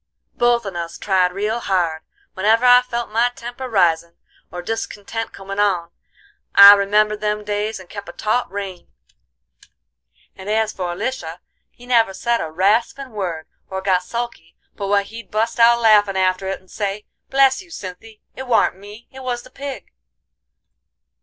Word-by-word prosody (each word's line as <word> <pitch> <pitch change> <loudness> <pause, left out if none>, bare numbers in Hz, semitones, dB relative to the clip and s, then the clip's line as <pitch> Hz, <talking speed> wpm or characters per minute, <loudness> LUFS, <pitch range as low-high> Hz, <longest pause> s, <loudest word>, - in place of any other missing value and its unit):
Both 240 -1 +2
on 195 -3 -6
us 170 -1 -5
tried 185 -2 +1
real 210 +5 -2
hard; 175 -7 -1 0.3
whenever 220 +5 +2
I 245 0 +8
felt 240 -2 -4
my 230 +3 +2
temper 245 +2 -7
risin' 170 -5 +1 0.4
or 175 0 -6
discontent 225 +1 -4
comin' 195 +1 -7
on 180 -5 +1 0.6
I 200 0 +11
remembered 210 +1 +2
them 210 0 -1
days 210 +1 -2
and 185 - -13
kep' 200 +1 -9
a - - -7
taut 215 +7 -1
rein; 195 -3 -6 1.5
and 190 +2 -9
as 220 0 +1
for 175 -2 -4
Lisha 180 -6 -4 0.3
he 245 - -17
never 230 -6 +2
said 235 +2 0
a 160 - -4
raspin' 220 - 0
word, 175 -7 -4 0.2
or 190 - -4
got 190 -1 +1
sulky, 235 -5 -6 0.2
but 200 - -5
what 200 0 +2
he'd 230 +3 -10
bust 225 +2 -1
out 235 +1 +6
laughin' 210 -4 +4
after 185 0 +1
it 195 - -3
and 185 - -24
say: 205 0 -3 0.2
'Bless 270 +2 +3
you, 370 - -17
Cynthy, 210 - -10
it 265 0 -7
warn't 225 -5 +2
me, 210 +3 -13
it 265 - -11
was 245 -2 -3
the 255 - -16
pig. 275 -5 -8
210 Hz, 165 wpm, -20 LUFS, 190-235 Hz, 1.5 s, I